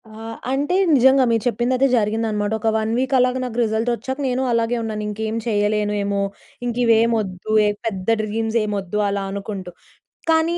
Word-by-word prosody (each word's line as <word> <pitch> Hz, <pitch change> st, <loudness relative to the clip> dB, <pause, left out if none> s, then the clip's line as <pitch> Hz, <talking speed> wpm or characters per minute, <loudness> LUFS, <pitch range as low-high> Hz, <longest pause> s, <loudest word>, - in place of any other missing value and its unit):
ఆ! -, -, -15 dB, 0.4 s
అంటే 285 Hz, +6 st, 0 dB, 0.2 s
నిజంగా 265 Hz, +1 st, +5 dB
మీరు 225 Hz, -2 st, +1 dB
చెప్పిందయితే 250 Hz, +2 st, +2 dB
జరిగిందనమాట. 210 Hz, -1 st, 0 dB
ఒక 225 Hz, +1 st, +1 dB
1 220 Hz, 0 st, -1 dB
వీక్ 265 Hz, +2 st, -1 dB
అలాగా 250 Hz, 0 st, +2 dB
నాకు 245 Hz, -2 st, -5 dB
రిజల్ట్ 220 Hz, +1 st, 0 dB
వచ్చాక 260 Hz, +4 st, -5 dB
నేను 255 Hz, 0 st, 0 dB
అలాగే 230 Hz, +1 st, +1 dB
ఉన్నాను, 215 Hz, -1 st, -3 dB
ఇంకేం 215 Hz, +1 st, -3 dB
చేయలేనేమో, 205 Hz, -1 st, 0 dB, 0.4 s
ఇంకా 240 Hz, 0 st, -2 dB
ఇవేమి 230 Hz, 0 st, +4 dB
వద్దు, 190 Hz, 0 st, -5 dB
ఏ -, -, +3 dB, 0.2 s
పెద్ద 190 Hz, -4 st, -3 dB
డ్రీమ్స్ 220 Hz, +1 st, -1 dB
ఏమి 210 Hz, -1 st, -2 dB
వద్దు 195 Hz, +2 st, -3 dB
అలా 200 Hz, 0 st, -2 dB
అనుకుంటూ. 195 Hz, -2 st, -5 dB, 0.6 s
కానీ 325 Hz, +1 st, +3 dB
220 Hz, 165 wpm, -21 LUFS, 210-245 Hz, 0.6 s, నిజంగా